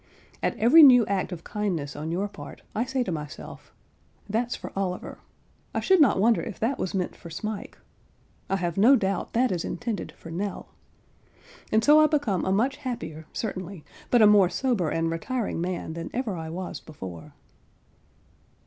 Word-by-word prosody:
At - - -1
every 250 +9 +7
new 250 -6 +8
act 195 -1 -1
of 170 -2 -7
kindness 180 -10 -3
on 155 +2 -4
your 190 +4 -1
part, 205 - -11
I 230 - 0
say 260 0 -1
to 190 - -4
myself 150 -2 -8 0.6
"That's 230 +4 -1
for - - -8
Oliver; 185 -2 -3 0.6
I - - +2
should 375 -3 +4
not 275 - +5
wonder 225 +3 +3
if 220 -6 -7
that 245 +5 0
was 190 - -2
meant 185 -2 -2
for 170 - -11
Smike; 210 +5 -6 0.7
I 195 - +1
have 175 -2 -2
no 235 +8 +7
doubt 195 -5 -1
that 245 +1 +2
is 175 -2 -1
intended 230 -6 -4
for 165 - -11
Nell;" 195 +4 -4 1.0
and 220 +1 +3
so 295 +4 +7
I 310 - +6
become 280 - 0
a 190 - 0
much 245 +8 +1
happier, 195 - -6
certainly, 185 -6 -5 0.2
but 240 -3 +5
a - - +9
more 205 -3 +6
sober 195 - 0
and 165 +1 0
retiring 210 +3 -2
man 175 -2 -3
than 165 0 -6
ever 240 -6 -2
I 160 -1 -6
was 180 +2 -5
before. 95 - -10
195 Hz, 175 wpm, -26 LUFS, 170-240 Hz, 1.0 s, a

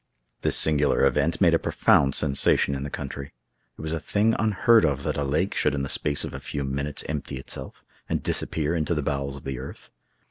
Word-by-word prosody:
This - - +4
singular 75 -3 +4
event 75 +4 +1
made 85 -4 +4
a 80 - +3
profound 70 -2 +2
sensation 70 -1 +3
in 70 - -4
the 70 - -5
country. 70 -1 -7 0.4
It - - -9
was 80 0 -5
a 80 - -2
thing 110 +6 0
unheard 110 +1 +3
of 70 -3 0
that - - -2
a 70 - -2
lake 75 +8 -1
should - - 0
in 70 - -3
the 70 - -4
space 70 +1 +1
of - - -8
a 65 - -6
few 70 +1 -5
minutes 70 +2 -3
empty 70 -3 -5
itself, 65 - -5 0.3
and - - -2
disappear 80 0 0
into 80 +1 -1
the 75 - -2
bowels 70 -1 -3
of 70 - -11
the 65 -2 -5
earth. 65 - -11
70 Hz, 215 wpm, -24 LUFS, 70-80 Hz, 0.4 s, This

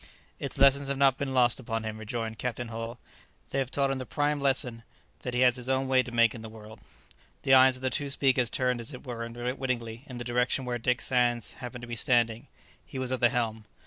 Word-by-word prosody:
"Its - - -5
lessons 140 0 +5
have 140 0 -1
not 135 -1 +4
been 140 -1 -2
lost 125 -2 +3
upon 115 -2 -3
him," 110 0 -5
rejoined 110 0 -4
Captain 120 -1 -3
Hull; 115 +1 -5 0.5
"they 135 - 0
have 130 -2 -1
taught 140 0 +1
him 135 - -2
the 130 - -5
prime 145 0 0
lesson 130 -4 +1 0.4
that 125 -1 -5
he 125 - +2
has 125 0 +5
his 125 +1 -4
own 130 0 +1
way 130 -1 +4
to 125 -1 -7
make 115 -2 +4
in 115 - -8
the 110 - -8
world." 110 0 -12 0.6
The 135 - +4
eyes 130 0 +7
of 130 - -7
the 130 - 0
two 145 -2 -1
speakers 130 -3 +2
turned 125 -1 0
as 120 +4 -4
it 125 - -12
were 120 -2 -5
unwittingly 120 0 -4
in 125 - -8
the 120 - -4
direction 125 +2 0
where 120 -1 -2
Dick 125 +1 0
Sands 120 -2 +1
happened 125 0 -8
to - - -7
be 120 - -4
standing. 115 -1 +2 0.4
He - - -9
was 130 -1 -2
at 130 - -1
the 120 - +5
helm. 115 -3 -2
125 Hz, 240 wpm, -28 LUFS, 115-130 Hz, 0.6 s, eyes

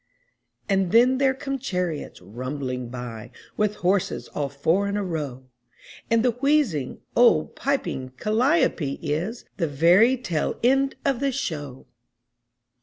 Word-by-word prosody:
And 190 -3 +1
then 250 +3 +5
there 265 -1 +3
come 275 0 -4
chariots 180 - -3
rumbling 125 +2 -5
by 120 -3 -7 0.3
With 210 0 0
horses 190 +1 0
all 145 -2 -3
four 160 +9 +1
in 200 +1 -1
a 205 - -1
row; 145 -8 -4 0.6
And 230 +1 +3
the 250 - +4
wheezing, 245 - 0
old, 235 -10 +4
piping 255 - -2
calliope 225 - +1
is 170 - -3
The 170 - 0
very 175 - +4
tail 175 -11 -2
end 270 +2 +3
of 275 -4 +1
the 275 0 +1
show! 145 - -5
190 Hz, 130 wpm, -24 LUFS, -, 0.6 s, then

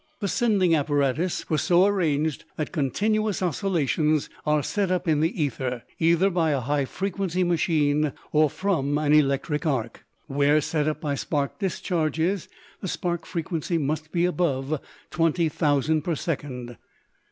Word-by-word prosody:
The 205 - -1
sending 195 -5 +2
apparatus 145 +2 0
was 155 -2 +1
so 180 +1 +4
arranged 160 -7 0
that 155 - -3
continuous 205 +7 0
oscillations 155 - 0 0.2
are 150 -1 +2
set 200 +3 -1
up 180 0 -1
in 155 -2 +3
the 165 +4 0
ether, 130 -4 -2 0.2
either 170 +4 +3
by 170 -3 +1
a 140 -2 +1
high 140 +3 0
frequency 185 +2 -2
machine 155 -4 +2 0.2
or 155 0 +4
from 145 -6 0
an 150 -1 +2
electric 150 +2 +2
arc. 120 -6 -2 0.2
Where 145 +1 +3
set 150 0 -1
up 155 0 -2
by 150 -4 -1
spark 140 +2 -2
discharges 175 -1 -1 0.3
the 190 - -5
spark 175 -1 -3
frequency 165 0 -2
must 155 +1 -2
be 170 0 +2
above 155 -5 0 0.3
twenty 165 0 +2
thousand 150 0 +1
per 165 +2 -1
second. 130 -7 -4
155 Hz, 145 wpm, -25 LUFS, 145-180 Hz, 0.3 s, so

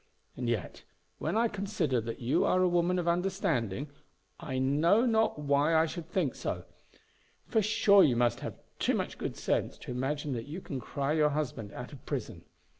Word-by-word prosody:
And 120 -1 -2
yet, 110 -6 -3 0.4
when - - -1
I 235 +1 +4
consider 190 - -1
that 115 +1 -5
you 120 +2 +2
are 185 - +3
a - - +4
woman 175 +1 +2
of 175 -1 -1
understanding, 155 - 0 0.5
I 130 - -4
know 155 - +3
not 225 -6 +2
why 145 +2 +2
I 160 0 +5
should 165 0 -6
think 170 -9 0
so; - - -4 0.8
for 220 - +2
sure 205 -2 +5
you 125 - +4
must 120 0 +2
have - - -6 0.2
too - - +2
much - - -3
good - - -4
sense - - -1
to - - -8
imagine 140 +3 -2
that 115 +1 -4
you 160 +5 -5
can 140 -7 -5
cry 140 +4 -2
your 155 -1 +4
husband 140 -8 -3
out 125 +4 -7
of 135 - -12
prison. - - -4
150 Hz, 190 wpm, -30 LUFS, 130-185 Hz, 0.8 s, I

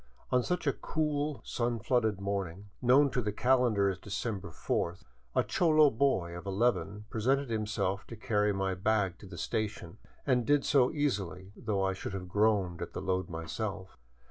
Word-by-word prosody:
On 125 - +4
such 180 +7 -2
a 140 - +3
cool, 150 -2 -2
sun 120 -1 -1
flooded 110 -3 +1
morning, 100 -1 -4
known 135 +3 +5
to 125 - 0
the 105 -2 -1
calendar 125 -3 +3
as 95 -2 -1
December 105 -2 -4
fourth, 85 +3 -2 0.3
a - - +4
cholo 155 -4 +4
boy 110 -9 +1
of 85 +3 -8
eleven 105 0 0
presented 130 +3 +1
himself 105 -3 -1
to 115 - -8
carry 105 -1 +1
my 95 -1 0
baggage 95 -1 0
to 100 - -11
the 90 -2 -9
station, 100 +1 -3 0.3
and 125 -3 +3
did 145 +3 +2
so 135 -4 +4
easily, 100 - -2
though 100 -3 -1
I 95 0 +1
should 95 - -6
have 95 -2 -5
groaned 100 -3 +1
at - - -5
the - - -4
load 95 -1 -1
myself. 95 +4 -5
105 Hz, 170 wpm, -31 LUFS, 95-125 Hz, 0.3 s, known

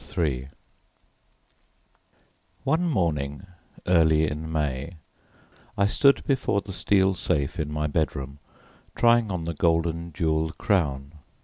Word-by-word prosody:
III 70 -6 0 2.2
One 160 +6 +1
morning 80 - -1 0.4
early 80 -3 +4
in 80 +2 -5
May 75 +1 -2 0.8
I 100 - +3
stood 140 +7 +3
before 135 -7 0
the 100 -1 -8
steel 95 0 +2
safe 75 -6 -1
in 75 -1 -2
my 75 0 -2
bedroom, 70 -2 -2 0.6
trying 120 -2 +4
on 90 -4 -3
the 85 - -3
golden 85 +1 0
jewelled 80 0 -1
crown. 75 -5 -1
80 Hz, 110 wpm, -25 LUFS, 75-95 Hz, 2.2 s, early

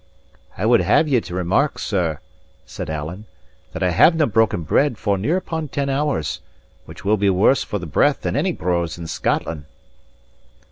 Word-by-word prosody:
"I 95 - -2
would 120 0 +5
have 160 - +3
ye 130 -5 +2
to 90 - -8
remark, 95 - +1
sir," 85 -7 -1 0.5
said - - -7
Alan, 80 +7 -5 0.5
"that - - -4
I 90 - +2
havenae 155 - +4
broken 110 -6 +2
bread 130 - +1
for 100 -2 0
near 135 - 0
upon 160 -4 -4
ten 140 0 -2
hours, 140 - -1 0.4
which - - -12
will 105 +2 +3
be 100 0 +2
worse 95 +8 +3
for 105 - -4
the 90 - -6
breath 75 - +2
than - - -2
any - - +1
brose 85 -1 -2
in 85 - -7
Scotland." 80 -2 -2
100 Hz, 175 wpm, -21 LUFS, 85-140 Hz, 0.5 s, would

